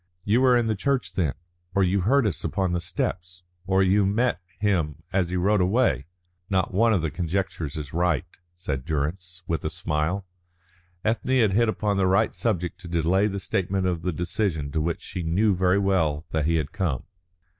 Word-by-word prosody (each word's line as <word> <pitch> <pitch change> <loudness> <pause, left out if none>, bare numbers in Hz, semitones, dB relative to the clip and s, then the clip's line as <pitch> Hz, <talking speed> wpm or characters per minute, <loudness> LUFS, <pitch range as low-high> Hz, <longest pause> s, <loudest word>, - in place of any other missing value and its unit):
"You 110 +5 +3
were 125 -2 +5
in 120 - +1
the 110 - +1
church, 135 +5 -1
then? 80 -8 0 0.4
Or 100 - +4
you 95 +2 +2
heard 130 +7 +3
us 85 -7 -2
upon 95 -3 0
the 90 - 0
steps? 90 +1 -4 0.2
Or 95 0 +3
you 100 +2 +4
met 105 +1 +1 0.2
him 85 -7 0
as 95 -3 +1
he 90 - -2
rode 100 +2 +3
away?" 90 - +2 0.4
"Not 95 -1 0
one 115 +4 +4
of 95 -7 +2
the 80 - -1
conjectures 85 -2 -2
is 75 -2 -6
right," 85 -1 +1 0.3
said 70 -7 -4
Durrance, 85 +4 -3
with 80 - -2
a 80 - -1
smile. 85 +3 -2 0.8
Ethne 120 +3 +2
had 110 -3 +3
hit 115 +2 +3
upon 105 -2 0
the 95 -1 +3
right 95 +4 +3
subject 90 -7 -2
to - - -10
delay 85 +4 +2
the 100 -1 -3
statement 95 0 -1
of 90 -3 0
the 90 - -1
decision 85 -3 -1
to 80 - 0
which 85 +2 -2
she 90 - -5
knew 95 +6 +2
very 90 +1 +2
well 85 -7 +1
that 80 -1 0
he 85 - +2
had 75 -3 -1
come. 90 -11 -1
90 Hz, 195 wpm, -25 LUFS, 80-100 Hz, 0.8 s, were